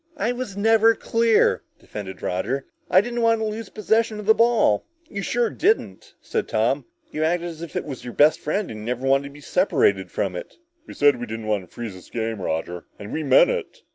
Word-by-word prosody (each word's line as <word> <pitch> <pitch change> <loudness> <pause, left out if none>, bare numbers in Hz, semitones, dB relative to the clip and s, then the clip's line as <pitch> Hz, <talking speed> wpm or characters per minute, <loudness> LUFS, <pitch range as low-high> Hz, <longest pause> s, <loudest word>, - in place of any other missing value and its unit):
"I 240 - 0
was 245 -6 -5
never 225 +2 +4
clear," 230 0 +2 0.2
defended 95 -3 -8
Roger. 120 +10 -2 0.2
"I 185 - +6
didn't 240 +2 -3
want 230 -1 +3
to 220 - -1
lose 215 +1 -5
possession 220 0 0
of 210 - -7
the 220 - +6
ball!" 230 - +3 0.2
"You 200 - -5
sure 235 +2 0
didn't," 425 +5 0
said - - -2
Tom. - - 0 0.3
"You 155 - -2
acted 175 +2 0
as 165 -1 -10
if 170 -3 -8
it - - -2
was 135 -5 -7
your 120 - -7
best 150 +2 +5
friend 195 +6 -2
and 110 - -7
you 105 - -8
never 125 +2 -2
wanted 135 +1 +3
to - - -7
be 145 - -13
separated 135 - +2
from 95 0 -2
it!" - - -8 0.3
"We - - -10
said 145 -3 +4
we 120 - -5
didn't 110 0 -6
want 105 -3 -1
to - - -25
freeze 115 -4 -5
this 90 - -14
game, 115 -3 -3
Roger, 85 0 -3
and 100 0 -8
we 160 - -1
meant 135 - +5
it!" 475 -4 -5
155 Hz, 225 wpm, -23 LUFS, -, 0.3 s, I